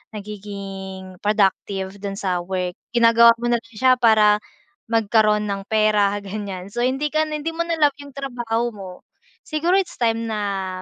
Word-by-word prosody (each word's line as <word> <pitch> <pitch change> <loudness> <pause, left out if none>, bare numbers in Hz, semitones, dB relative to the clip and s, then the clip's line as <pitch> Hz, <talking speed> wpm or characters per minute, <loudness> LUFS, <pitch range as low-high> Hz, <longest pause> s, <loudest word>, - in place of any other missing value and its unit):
nagiging 195 -2 -8
productive 195 -1 0
dun 200 -1 -5
sa 185 -3 -1
work. 180 0 -3 0.2
Ginagawa 230 0 +6
mo 240 +1 -1
na 235 - +2
lang 230 0 -21
siya 255 +3 +3
para 215 -2 +5 0.5
magkaroon 215 -1 +3
ng 200 -1 -3
pera, 210 -2 +2
ganyan. 195 -2 -6
So, 240 - -5
hindi 270 +4 0
ka 310 0 +2
na, 305 0 -3
hindi 325 +2 -3
mo 335 - 0
na 335 - 0
love 290 -2 +4
'yung 280 -1 -12
trabaho 240 -3 -2
mo. 195 -3 -8 0.6
Siguro 330 +4 +1
it's 375 - -4
time 230 -1 +1
na 195 -4 -3
215 Hz, 165 wpm, -22 LUFS, 195-240 Hz, 0.6 s, Ginagawa